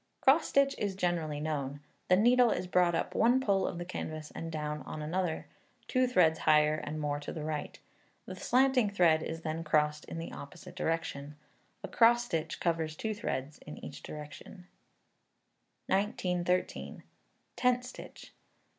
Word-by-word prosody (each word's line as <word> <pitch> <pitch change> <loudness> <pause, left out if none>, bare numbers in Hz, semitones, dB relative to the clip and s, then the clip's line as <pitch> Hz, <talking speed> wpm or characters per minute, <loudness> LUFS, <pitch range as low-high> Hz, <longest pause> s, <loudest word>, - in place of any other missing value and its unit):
Cross 285 +5 +5
stitch 275 0 +3
is 200 -2 -1
generally 170 -5 -1
known. 145 -2 -3 0.3
The 180 - +6
needle 240 +4 +5
is 185 - -1
brought 180 -1 +3
up - - -2
in - - 0
one 240 +3 +5
pole 200 -7 +1
of - - -4
the 175 - -5
canvas 155 -4 -6
and 165 0 -5
down 150 -1 -3
on 155 - -7
another, 165 +2 -2 0.4
two 255 -1 +2
threads 165 -10 +3
higher 150 0 +4
and 155 0 -4
more 145 -1 -1
to 145 - -6
the 155 - -5
right. 150 -1 -4 0.5
The - - -7
slanting 255 -3 +3
thread 170 -5 +4
is 165 0 -5
then 160 0 -3
crossed 150 -1 +1
in - - -7
the 165 - -5
opposite 145 +5 -10
direction. 150 -3 -3 0.5
A - - -3
cross 240 +1 +4
stitch 165 -9 -3
covers 160 -2 -1
two 220 +6 -2
threads 150 - -4
in 150 - -10
each - - -8
direction. 150 +5 -10 1.2
1913. 180 -2 -1 0.5
Tent 250 0 +2
Stitch. 250 - -11
165 Hz, 160 wpm, -31 LUFS, 155-205 Hz, 1.2 s, The